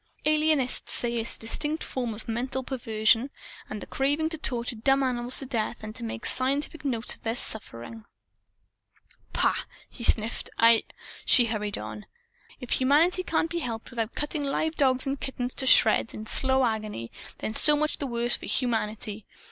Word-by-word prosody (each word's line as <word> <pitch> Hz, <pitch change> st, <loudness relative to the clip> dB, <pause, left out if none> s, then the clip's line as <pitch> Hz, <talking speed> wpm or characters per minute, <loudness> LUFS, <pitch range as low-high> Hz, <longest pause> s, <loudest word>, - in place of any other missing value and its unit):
Alienists 305 Hz, -4 st, +2 dB
say 240 Hz, -1 st, 0 dB
it's 225 Hz, 0 st, -3 dB
a -, -, -18 dB
distinct 295 Hz, +7 st, -1 dB
form 245 Hz, -4 st, -3 dB
of 220 Hz, -, -10 dB
mental 255 Hz, +3 st, -2 dB
perversion, 230 Hz, -1 st, +2 dB, 0.4 s
the 210 Hz, -1 st, -6 dB
craving 290 Hz, +4 st, 0 dB
to 320 Hz, -, -4 dB
torture 240 Hz, -3 st, -1 dB
dumb 270 Hz, +5 st, +2 dB
animals 245 Hz, -1 st, 0 dB
to 270 Hz, -, -3 dB
death 235 Hz, -2 st, -2 dB
and 215 Hz, 0 st, -7 dB
to -, -, -6 dB
make 115 Hz, 0 st, -5 dB
scientific 280 Hz, +4 st, +1 dB
notes 240 Hz, -5 st, -1 dB
of -, -, -16 dB
their 225 Hz, 0 st, -2 dB
sufferings." 220 Hz, -, -1 dB, 1.3 s
"Pah!" -, -, +3 dB, 0.4 s
he 240 Hz, -, -10 dB
sniffed. 225 Hz, -1 st, +3 dB
"I 230 Hz, 0 st, +6 dB, 0.2 s
" -, -, -16 dB
She 245 Hz, -, +6 dB
hurried 210 Hz, -3 st, -2 dB
on 210 Hz, -, -7 dB, 0.5 s
"If 250 Hz, -, -8 dB
humanity 310 Hz, +8 st, +3 dB
can't 330 Hz, -2 st, -1 dB
be 340 Hz, -, -1 dB
helped 230 Hz, -6 st, -5 dB
without 230 Hz, -1 st, -3 dB
cutting 295 Hz, 0 st, -1 dB
live 310 Hz, +3 st, -1 dB
dogs 260 Hz, -2 st, +2 dB
and 275 Hz, 0 st, -3 dB
kittens 250 Hz, -2 st, -3 dB
to 265 Hz, -, -2 dB
shreds, 230 Hz, -, +4 dB
in 215 Hz, -, -7 dB
slow 265 Hz, +3 st, +3 dB
agony 215 Hz, -, -3 dB, 0.3 s
then 215 Hz, -, -4 dB
so 300 Hz, +6 st, +5 dB
much 305 Hz, +1 st, -1 dB
the 280 Hz, -, -2 dB
worse 240 Hz, 0 st, +1 dB
for -, -, -8 dB
humanity! 220 Hz, -3 st, -2 dB
245 Hz, 170 wpm, -27 LUFS, 225-275 Hz, 1.3 s, I